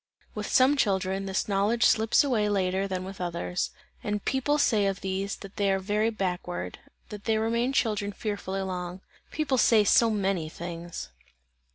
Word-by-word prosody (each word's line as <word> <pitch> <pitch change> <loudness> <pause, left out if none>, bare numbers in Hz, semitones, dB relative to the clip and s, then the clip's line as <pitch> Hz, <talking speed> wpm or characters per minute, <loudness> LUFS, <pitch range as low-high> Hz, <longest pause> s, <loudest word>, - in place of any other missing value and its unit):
With 210 -1 -4
some 265 +3 +5
children, 195 -5 0
this 190 0 -1
knowledge 210 +4 +1
slips 220 +4 +4
away 225 -7 +1
later 190 -1 0
than 185 -1 -3
with 190 0 -8
others, 175 0 -2 0.3
and 210 -1 -2
people 270 +3 +1
say 215 -8 +3
of 195 -1 -2
these, 195 +1 -2
that 195 -1 -12
they 200 -1 +2
are 195 - +2
very 210 +3 0
backward, 180 -4 -3 0.3
that 210 -1 -9
they 220 -1 +2
remain 235 +3 +1
children 210 -6 0
fearfully 200 -2 -3
long. 180 -1 -5 0.3
People 280 -4 0
say 220 -3 +5
so 230 +3 +5
many 195 -6 0
things! 170 - -7
200 Hz, 165 wpm, -27 LUFS, 190-220 Hz, 0.3 s, some